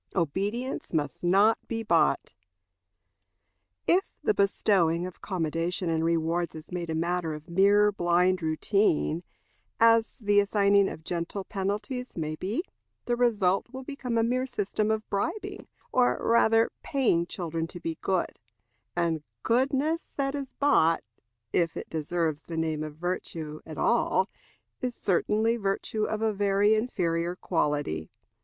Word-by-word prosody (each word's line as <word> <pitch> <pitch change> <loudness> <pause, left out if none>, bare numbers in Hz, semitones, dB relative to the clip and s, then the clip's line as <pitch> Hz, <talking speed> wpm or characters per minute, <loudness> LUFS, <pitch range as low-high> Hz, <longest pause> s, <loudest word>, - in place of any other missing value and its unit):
Obedience 200 - -2
must 145 -3 -2
not 200 +6 +4
be 225 -1 -3
Bought. 170 -8 +2 1.5
If 370 +3 +4 0.2
the - - +3
bestowing 180 -4 +2
of 185 - -9
commendation 170 -1 -2
and 160 0 0
rewards 165 +1 0
is 155 +2 -10
made 175 -2 -4
a 160 - -1
matter 170 -1 -1
of 150 +2 -11
mere 205 +3 +5
blind 180 0 +2
routine, 160 0 +1 0.6
as 230 0 +4
the 205 -4 +3
assigning 200 -1 +3
of 160 - -9
gentle 175 +4 -3
penalties 210 +7 -3
may 155 -1 -2
be, 205 - -2 0.4
the 240 - +1
result 210 -6 +2
will 260 0 -7
become 255 -4 -3
a 225 - +3
mere 255 +3 0
system 210 -2 -1
of 220 0 -1
bribing, 200 - -3 0.2
or 250 -1 +3
rather 225 0 +3
paying 200 -11 +1
children 165 -2 -3
to 175 - -10
be 165 -1 -4
good; 185 -2 -1 0.6
and 170 -3 0 0.2
goodness 275 +7 +1 0.2
that 275 -1 0
is 275 -2 -5
bought, 165 - +3 0.5
if 170 -2 +1
it - - -7
deserves 160 -1 -1
the 165 - -7
name 160 -1 -1
of 155 -1 -5
virtue 160 -2 -4
at 155 - -8
all, 195 -5 +2 0.5
is 250 -2 -2
certainly 215 +5 +1
virtue 210 +1 -1
of 215 0 -2
a 220 -1 +2
very 200 +1 +3
inferior 175 -7 0
quality. 145 - -1
190 Hz, 140 wpm, -28 LUFS, 165-225 Hz, 1.5 s, mere